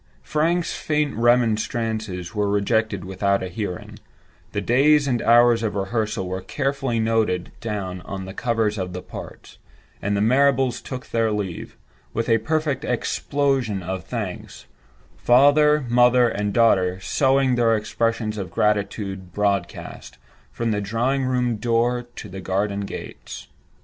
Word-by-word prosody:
Frank's 165 - 0
faint 150 -2 -1
remonstrances 110 -4 0
were 105 -2 0
rejected 105 -1 0
without 100 +1 0
a 95 - -4
hearing; 100 -3 -6 0.5
the 105 - -2
days 140 +7 +3
and 120 -3 0
hours 120 0 +5
of 110 -2 -2
rehearsal 100 -1 -2
were 95 +1 -4
carefully 135 +2 -2
noted 110 -5 0
down 100 -5 -4
on 95 0 -6
the 95 - -8
covers 110 -2 0
of 90 -1 -4
the 90 - -6
parts; - - -10 0.4
and 100 +1 0
the - - +1
Marrables 130 +2 +3
took 130 +1 -7
their 115 -1 +1
leave, 100 -5 -4 0.4
with 115 +2 -1
a 115 0 +4
perfect 150 +1 -1
explosion 130 -4 -1
of 95 0 -4
thanks—father, 145 - +1
mother, 125 +1 +5
and 105 -2 -2
daughter 95 -5 +3
sowing 135 +5 +2
their 115 -2 +3
expressions 110 0 -1
of 95 -3 -5
gratitude 100 -2 -1
broadcast, 100 -2 -3 0.3
from 115 -1 -2
the 105 -1 0
drawing 120 +6 0
room 125 -3 0
door 120 +2 0
to - - -8
the 95 0 -8
garden 100 +2 -1
gates. - - -8
115 Hz, 135 wpm, -23 LUFS, 100-125 Hz, 0.5 s, hours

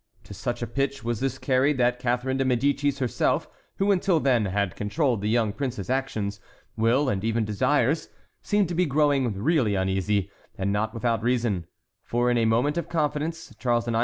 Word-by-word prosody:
To - - -11
such 120 +4 -3
a - - -2
pitch 135 +2 -2
was 120 -1 -2
this 135 0 -1
carried 135 +2 +2
that 125 0 +2
Catharine 125 +1 0
de 135 - +1
Médicis 140 +2 +1
herself, 130 -4 0 0.3
who 200 +1 +2
until 180 -3 +2
then 125 -7 +2
had 100 -1 -1
controlled 115 +2 0
the 105 - -1
young 110 -2 +1
prince's 125 -5 -4
actions, 110 -7 -2 0.4
will, 115 +6 +2
and 100 -6 -1
even 115 0 0
desires, 130 +7 +1 0.3
seemed 205 -2 +1
to - - -2
be 180 0 +2
growing 140 -4 +2
really 125 -5 +2
uneasy, 95 +1 0 0.3
and 95 +1 -1
not 110 +2 -1
without 115 -1 0
reason; 115 -7 0 0.3
for, 120 +1 0
in 120 - +2
a 115 - +2
moment 125 +8 +2
of - - -6
confidence, 160 +1 -2
Charles 120 -2 +1
IX. 115 -1 0
125 Hz, 185 wpm, -26 LUFS, 110-140 Hz, 0.4 s, carried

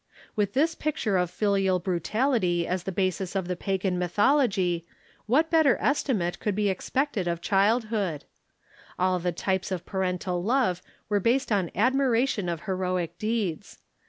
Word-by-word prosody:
With 205 -2 0
this 310 +5 +2
picture 295 -11 -1
of 180 -2 +1
filial 195 -2 +1
brutality 180 - 0
as 180 0 -2
the 190 - -2
basis 185 0 -1
of 190 -2 -1
the 180 - -2
pagan 190 0 -1
mythology, 190 - +2 0.5
Avhat 310 +7 +3
better 315 -6 +4
estimate 225 -11 0
could 210 -3 -1
be 210 -1 +1
expected 215 +1 -1
of 170 -1 -1
childhood? 205 - +1 0.7
All 185 0 +1
the 175 +1 -1
types 190 +2 -2
of 180 -2 -3
parental 180 -2 -2
love 215 -6 +1 0.3
were 205 -1 +1
based 245 +5 +1
on 190 -5 +1
admiration 250 -3 +2
of 170 -2 -3
heroic 185 -3 -2
deeds. 215 -7 -2
195 Hz, 145 wpm, -26 LUFS, 180-230 Hz, 0.7 s, better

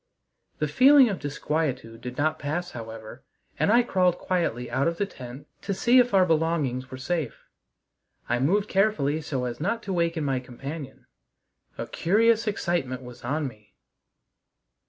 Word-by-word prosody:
The 150 - 0
feeling 260 - +6
of 200 - -3
disquietude 140 -5 -3
did 125 +1 -7
not 155 +2 +1
pass 175 +5 -3
however, 110 -2 -9 0.4
and - - +3
I 240 +2 +6
crawled 180 -5 +2
quietly 165 -10 -1
out 140 - +1
of 170 0 -1
the 200 - +1
tent 130 -4 -10 0.2
to 200 - -2
see 240 +6 +5
if 245 0 +3
our 190 -2 +5
belongings 155 -6 0
were 130 - -7
safe. 150 -1 -3 0.8
I 120 +1 +1
moved 195 +10 +2
carefully 190 -8 +1
so 135 -5 -3
as 120 -1 -4
not 200 +8 -1
to 195 - -3
waken 170 -2 0
my 135 -2 0
companion. 135 +3 -8 0.7
A - - -3
curious 225 +5 +2
excitement 165 -10 -1
was 125 -1 -11
on 145 +4 -1
me. 105 -4 -14
155 Hz, 155 wpm, -26 LUFS, 130-190 Hz, 0.8 s, feeling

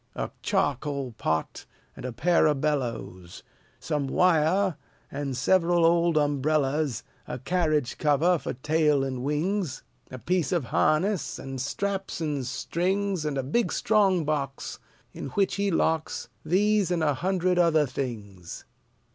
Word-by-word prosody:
A - - -3
charcoal 140 -2 -1
pot 80 -8 -3 0.3
and - - -9
a 130 - -3
pair 165 +8 +3
of 150 -2 +1
bellows; 120 - -3 0.4
Some 145 -2 -2
wire, 180 +3 +3 0.4
and 140 -2 -3
several 175 +3 +3
old 170 -1 +3
umbrellas; 145 -2 +1 0.2
A - - -4
carriage 155 -2 0
cover, 155 +4 +3
for - - -4
tail 150 +1 +2
and 130 -2 -3
wings; 155 +2 -1 0.3
A 130 - -7
piece 180 +5 -1
of 175 -5 +1
harness; 160 - +1
and 135 -1 -6
straps 195 +8 -3
and 150 -4 -2
strings; 185 +5 -1
And 145 -2 -2
a 135 - -1
big 180 - 0
strong 195 -6 +2
box, 140 -3 -3 0.3
In - - -6
which 195 -1 +1
he 200 0 +1
locks 160 -2 0
These 205 +1 +2
and 175 -3 0
a 150 -2 +2
hundred 180 +3 0
other 160 -3 +4
things. 105 -10 -6
155 Hz, 140 wpm, -26 LUFS, 135-180 Hz, 0.4 s, other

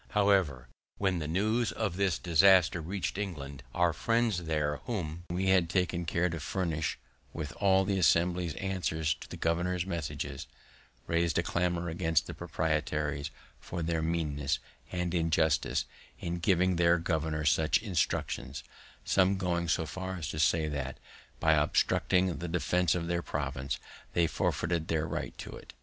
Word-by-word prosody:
However, 95 -11 +3 0.3
when 95 -3 +1
the 75 - -3
news 110 +7 +1
of 105 -6 -2
this 95 -4 +1
disaster 90 0 +5
reached 95 +3 -3
England, 70 -9 -5
our 90 -1 +3
friends 115 +1 +1
there 75 -2 0
whom 85 -7 -4
we 95 +2 0
had 90 -3 +4
taken 90 -1 0
care 85 +2 +1
to 85 -1 -4
furnish 80 0 -2 0.4
with 75 -3 -4
all 95 -1 +4
the 95 -1 0
Assembly's 85 0 +2
answers 85 -5 -1
to - - -12
the - - -7
governor's 85 +2 0
messages, 75 -5 -4 0.6
rais'd 85 -2 +1
a - - +2
clamor 85 0 0
against 80 -2 +1
the - - -6
proprietaries 75 -2 -1 0.3
for 85 -1 -5
their 80 0 0
meanness 75 -4 0 0.3
and 90 -1 -2
injustice 80 -2 +2 0.3
in 85 0 -3
giving 90 0 +2
their 85 0 +5
governor 80 -2 -1
such 80 +2 +4
instructions; 80 - -2 0.4
some 95 0 +3
going 85 -2 -1
so 80 0 +1
far 95 +3 -5
as 85 -4 -4
to 75 - -4
say 80 0 +3
that, 70 -3 -4 0.4
by 80 0 +4
obstructing 85 +4 +2
the 85 - -4
defense 90 0 +1
of 85 -1 -2
their 85 0 0
province, 70 -3 -3 0.4
they 85 - +3
forfeited 85 0 -1
their 80 -1 0
right - - -4
to - - -7
it. - - -12
85 Hz, 155 wpm, -30 LUFS, 80-90 Hz, 0.6 s, disaster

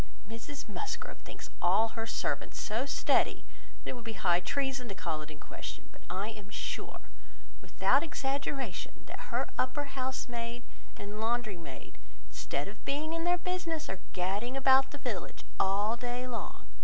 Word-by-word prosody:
"Mrs 240 +6 -6
Musgrove 315 - -3
thinks - - -8
all 195 +6 +6
her 225 0 -3
servants - - 0
so 230 +6 +1
steady, - - +4 0.4
that - - -2
it - - -3
would 240 - -7
be 225 -1 -3
high 175 -2 +5
treason 265 +4 0
to 195 - -3
call 160 -5 -1
it 150 - -7
in 150 -1 -9
question; - - -6
but - - -15
I 200 +3 0
am 210 -3 -8
sure, - - -3 0.6
without 275 - +4
exaggeration, 275 - -1
that - - -7
her - - +1
upper 255 +3 +2
house 260 -1 -1
maid 235 0 -3 0.3
and 205 +1 -5
laundry 230 -2 +2
maid, 150 -6 -9 0.3
instead 140 +1 -1
of 205 +2 -9
being 305 +3 0
in 330 0 0
their 355 0 +5
business, 345 -3 -1
are 190 - -4
gadding 200 +8 0
about 265 0 +7
the 290 - -6
village, 245 -10 -3 0.2
all 205 +4 +4
day 245 +1 -2
long. 245 -2 -4
235 Hz, 165 wpm, -33 LUFS, 200-270 Hz, 0.6 s, about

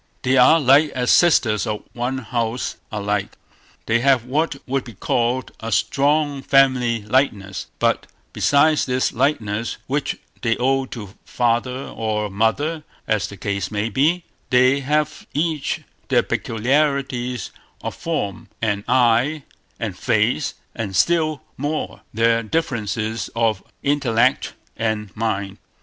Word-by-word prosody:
They 130 0 +2
are 135 +6 +7
like 145 +2 +5
as 125 -1 +1
sisters 120 - +4
of 105 -1 -3
one 125 +2 -2
house 120 -1 -2
are 105 -1 -3
like. 105 -1 -2 0.5
They 115 +1 +2
have 130 -2 +3
what 150 +4 0
would 135 0 -1
be 115 -4 -11
called 120 +5 0
a 115 0 -5
strong 145 +5 +1
family 130 -5 +3
likeness; 105 -5 0
but - - +1 0.3
besides 150 +2 +3
this 130 0 0
likeness, 115 -4 0
which 140 +2 -1 0.2
they 115 -1 +1
owe 135 +1 +1
to 105 -6 -8
father 125 +2 0
or 105 -2 -2
mother, 145 +10 0 0.2
as 110 -2 +1
the 100 - -10
case 100 -1 -2
may 105 +1 -1
be, 155 - +2 0.3
they 130 +2 +4
have 150 +2 -1
each 155 -1 -1 0.3
their - - +3
peculiarities 125 -1 0 0.3
of - - -3
form, 105 - -3
and 100 -3 -1
eye, 125 +4 +3 0.4
and - - -3
face, - - +1 0.2
and 100 -4 -4
still 155 - +2
more, 145 +3 -3
their 115 +1 +2
differences 110 -5 -2
of 115 -4 +1 0.2
intellect 135 -5 +2 0.2
and 110 -3 -2
mind. 100 -3 -2
125 Hz, 130 wpm, -21 LUFS, 110-140 Hz, 0.5 s, are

